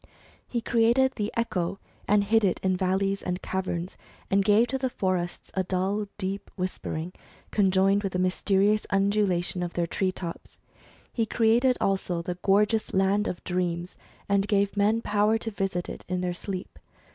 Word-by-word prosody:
He 235 - -2
created 235 +3 +3
the 210 -1 -3
echo, 195 -5 -1 0.3
and 205 0 +4
hid 220 +2 +3
it 190 -3 +2
in 185 -1 +2
valleys 190 +2 0
and 180 0 -3
caverns, 185 -2 -3 0.3
and 195 0 +4
gave 210 +4 +5
to 265 - -1
the 260 -1 0
forests 185 -5 -2
a 190 - 0
dull 190 +3 -1
deep 195 0 -4
whisper 185 -3 -4
ing, 165 +3 -4 0.4
conjoined 195 0 +3
with 195 -3 -3
a - - +2
mysterious 195 +3 +2
undulation 195 -3 +1
of 175 -1 -3
their 175 - 0
tree 185 +2 -1
tops. 170 -2 -7 0.6
He 225 -2 0
created 235 +3 +3
also 185 -3 0
the 175 +1 -4
gorgeous 210 +2 +2
land 195 +2 +2
of 175 - -5
dreams, 180 -1 -2 0.3
and 200 0 +2
gave 200 -1 +1
men 215 +3 +2
power 210 +2 +2
to 225 0 -4
visit 195 -3 -2
it - - -7
in 180 0 -1
their 180 -1 -1
sleep. 185 +1 -6
195 Hz, 170 wpm, -27 LUFS, 185-210 Hz, 0.6 s, gave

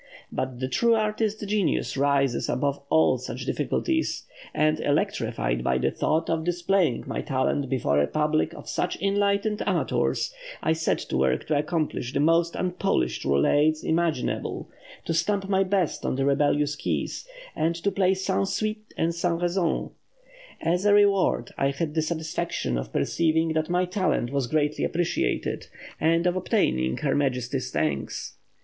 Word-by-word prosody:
But 130 -2 -3
the 130 - -1
true 230 - +3
artist 215 -1 -1
genius 200 -3 0
rises 140 -2 +1
above 140 +3 0
all 160 -5 +4
such 125 +1 -6
difficulties, 320 - -1 0.3
and 155 0 +2
electrified - - 0
by 65 0 +2
the - - +1
thought 160 +1 0
of 165 -1 0
displaying 175 -5 +1
my - - -3
talent 135 +1 0
before 75 - +2
a 75 - +2
public 155 0 +1
of - - -11
such 180 - -2
enlightened 200 +2 +1
amateurs, - - 0 0.3
I 160 - +3
set 160 0 0
to - - -3
work 65 -1 +1
to 150 - +1
accomplish 150 -5 -2
the - - 0
most 165 +3 +3
unpolished 185 +2 -1
roulades 145 - +3
imaginable, 160 -5 -1 0.3
to - - -1
stamp 195 +4 0
my 195 -1 +3
best 190 -3 0
on - - -1
the 135 +1 0
rebellious 145 +1 +2
keys, - - -3 0.3
and 165 +2 +1
to 185 +4 -1
play 190 0 +2
sans 190 +1 0
suite 215 0 -3
et 165 +1 +1
sans 170 0 0
raison.... 175 -1 0 0.7
As 175 +3 +1
a 205 0 +5
reward, 195 -11 +3
I 135 - +3
had 150 +2 -3
the 160 - +1
satisfaction 160 - -2
of - - -4
perceiving 160 - +1
that 155 0 -1
my 180 +1 +2
talent 180 -9 0
was 140 -3 0
generally 150 +1 0
appreciated, 170 0 -1 0.3
and 165 +2 +2
of 180 0 +2
obtaining 65 - +1
her - - 0
Majesty's 130 -2 -1
thanks. 75 -2 -2
160 Hz, 155 wpm, -26 LUFS, 135-185 Hz, 0.7 s, a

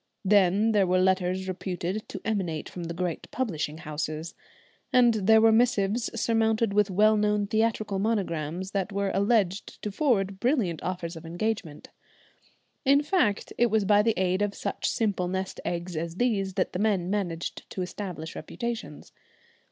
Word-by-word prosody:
Then 200 +2 +4
there 200 -3 +3
were 180 +1 +3
letters 185 0 +1
reputed 185 +2 -4
to - - -6
emanate 185 -8 -2
from 175 -2 -7
the 170 - -4
great 175 -2 -3
publishing 160 -11 -2
houses, 155 0 -4 0.6
and 245 -2 +5
there 220 +1 +5
were 225 0 +6
missives 225 -1 +2
surmounted 225 -1 +1
with 205 0 +3
well 215 +3 +4
known 210 -1 +1
theatrical 215 -1 0
monograms 185 -4 -2
that 200 0 -2
were 200 0 -1
alleged 200 -2 +1
to 210 - -2
forward 200 -6 +1
brilliant 230 - 0
offers 175 -2 -4
of 160 - -9
engagements. 175 -1 -4 0.9
In 280 +2 +4
fact 260 - +1
it 240 - +5
was 215 -1 +2
by 205 +1 +5
the 225 -1 +1
aid 185 +1 +1
of 205 -1 0
such - - -2
simple 200 -5 0
nest 190 +1 -3
eggs 175 0 -3
as 165 +1 -3
these 195 -4 0
that 190 - 0
the 180 - -2
men 195 -4 +1
managed 175 -5 -3
to 185 - -3
establish 180 -3 -6
reputations. 225 -4 -6
195 Hz, 160 wpm, -27 LUFS, 180-220 Hz, 0.9 s, were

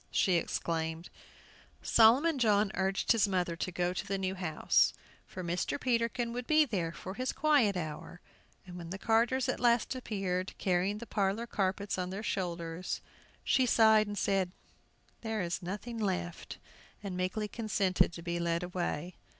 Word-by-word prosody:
she 185 - +2
exclaimed. 165 0 -3 0.7
Solomon 265 +7 +5
John 210 -3 +3
urged 190 0 0
his 225 -3 +4
mother 180 -3 0
to 185 - -3
go 175 +1 -1
to - - -3
the 195 - -1
new 190 0 -2
house, 175 -5 +2 0.3
for 185 - -7
Mr. 175 +9 -2
Peterkin 235 -1 0
would 245 0 -5
be 310 0 +5
there 185 - -2
for 170 +4 -7
his 255 +4 -2
"quiet 280 -11 +3
hour." 160 +1 -6 0.5
And 180 -1 -9
when 170 -1 -8
the 190 - -4
carters 235 +5 +2
at 255 - -1
last 240 0 +3
appeared, 195 -7 -3
carrying 185 +2 +1
the 235 - -7
parlor 205 +1 0
carpets 200 -2 -1
on 180 0 -2
their 195 +3 -5
shoulders, 175 -3 -3 0.4
she 260 -1 +3
sighed 220 -2 +5
and 205 0 -5
said, 195 -3 +1 0.7
"There 220 -3 -2
is 170 0 -3
nothing 210 +6 -5
left," 180 -4 -3 0.5
and 195 -3 -4
meekly 185 +4 -1
consented 200 -6 +1
to 170 - -8
be 170 0 -2
led 170 0 0
away. 175 -1 -3
195 Hz, 160 wpm, -31 LUFS, 180-225 Hz, 0.7 s, Solomon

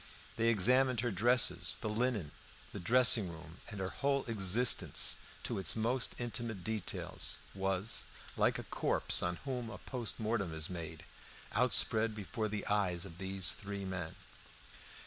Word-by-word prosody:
They 115 0 0
examined 125 +3 +3
her 120 -1 -1
dresses, 120 +5 +3
the - - -4
linen, 110 - -1 0.4
the - - -7
dressing 115 0 +5
room; 80 0 -11
and 105 -4 -7
her 95 0 -2
whole 140 -1 -1
existence 115 +2 +3 0.3
to - - -2
its 95 - +1
most 120 +3 0
intimate 120 -5 -3
details, 110 -4 -2 0.2
was, 95 +2 0 0.3
like - - +2
a - - -6
corpse - - +1
on 90 0 -1
whom 125 -4 -4
a 110 - -8
post 120 -4 -4
mortem 105 -7 -2
is 80 +3 -1
made, 80 -3 -7 0.5
outspread 115 -2 +3
before 105 +2 -4
the 105 -1 -4
eyes 95 -4 0
of 85 -2 -11
these 95 -1 +1
three 100 -1 -5
men. 95 -4 -5
105 Hz, 145 wpm, -34 LUFS, 95-120 Hz, 0.5 s, dressing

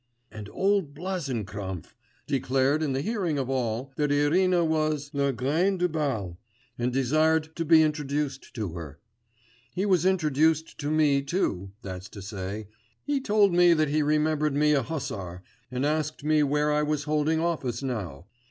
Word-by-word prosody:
And 105 -1 -8
old 195 -7 0
Blazenkrampf 110 - -4 0.3
declared 135 +2 +1
in 145 -4 0
the 135 +1 -1
hearing 190 -8 -1
of 135 -1 -2
all, 125 +1 -2
that 150 -1 +1
Irina 170 +5 +3
was 155 -2 0
la 140 -1 +1
reine 150 - +1
du 180 0 +2
bal, 130 - -2 0.4
and 120 +1 -1
desired 155 +5 +1
to 165 - -2
be 160 0 +6
introduced 145 -2 -2
to 105 -5 -3
her; 80 -4 -8 0.8
he 190 +2 0
was 185 -5 +3
introduced 160 -3 +1
to 145 - -2
me 150 -3 +3
too, 100 - -2
that's 95 -1 -7
to 100 - -10
say, 100 +1 -5 0.4
he 285 -2 -1
told 205 -6 +3
me 175 -1 +6
that 155 -2 +1
he 155 +1 +1
remembered 150 0 +1
me 150 +1 +3
a 145 -2 +3
hussar, 100 - -5 0.3
and 130 +2 -2
asked 155 0 -1
me 155 0 +3
where 150 +1 +1
I 150 - +2
was 150 -1 -1
holding 155 +1 +1
office 140 -8 -2
now. 95 - -4
150 Hz, 160 wpm, -27 LUFS, 125-160 Hz, 0.8 s, be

